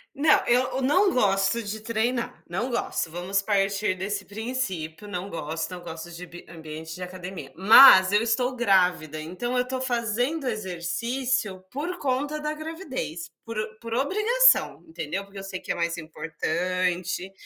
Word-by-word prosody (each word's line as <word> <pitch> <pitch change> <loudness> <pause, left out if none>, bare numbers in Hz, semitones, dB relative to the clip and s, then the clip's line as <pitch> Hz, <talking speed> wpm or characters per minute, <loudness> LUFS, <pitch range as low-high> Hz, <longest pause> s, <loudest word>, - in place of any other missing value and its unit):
Não, 300 +2 +4
eu 245 +1 +4
eu 265 - -1
não 370 +9 +3
gosto 195 0 +2
de 215 +1 -5
treinar, 230 +2 -2
não 190 +9 -2
gosto, 235 -8 -2
vamos 180 +4 -1
partir 195 -1 +1
desse 195 +3 -3
princípio. 205 -6 -4
Não 195 -1 -5
gosto, 160 +1 -4
não 180 -1 -7
gosto 165 0 -8
de 170 +1 -8
bi 175 0 -12
ambiente 160 -1 -8
de 180 - -10
academia, 180 -6 -8
mas 190 0 +9
eu 205 +1 +4
estou 245 +3 +1
grávida, 180 -9 +2
então 185 +10 -4
eu 250 - +3
estou 255 +1 -4
fazendo 245 +4 -1
exercício 215 +2 -2
por 335 +7 -4
conta 285 +2 -1
da 300 0 -2
gravidez, 305 - -6 0.2
por 230 -1 -6
o 215 0 -4
por 230 -1 -6
obrigação, 425 - +3
entendeu? 165 +4 -4
Porque 200 0 -11
eu 195 - -8
sei 185 -1 -5
que - - -4
é - - -1
mais 170 0 -1
importante, 175 +3 -2
200 Hz, 160 wpm, -25 LUFS, 175-250 Hz, 0.2 s, mas